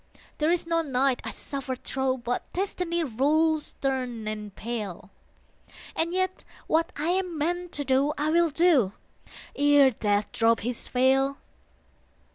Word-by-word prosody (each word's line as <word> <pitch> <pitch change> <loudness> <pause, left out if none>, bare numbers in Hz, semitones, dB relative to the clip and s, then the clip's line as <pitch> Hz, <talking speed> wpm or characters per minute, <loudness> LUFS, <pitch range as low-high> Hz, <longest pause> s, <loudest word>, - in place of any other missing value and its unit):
There 305 +1 +2
is 345 0 +1
no 330 0 +1
night 270 -3 +1
I - - -4
suffer 275 -2 -5
thro 265 +1 -1
But 245 0 -4
Destiny 355 -3 -1
rules 305 +4 +2
stern 250 -5 -3
and 210 -2 -5
pale: 210 -5 -5 0.8
And 330 +1 0
yet 370 +1 -1 0.2
what 325 +1 +1
I 300 +4 -1
am 365 -2 -1
meant 350 +3 -2
to 290 - 0
do 270 +3 +2
I 300 +1 0
will 340 0 +4
do, 295 - +3 0.6
ere 285 -2 +5
Death 205 -2 0
drop 230 0 +2
his 240 +1 -4
veil. 270 +2 +2
275 Hz, 140 wpm, -27 LUFS, 245-330 Hz, 0.8 s, ere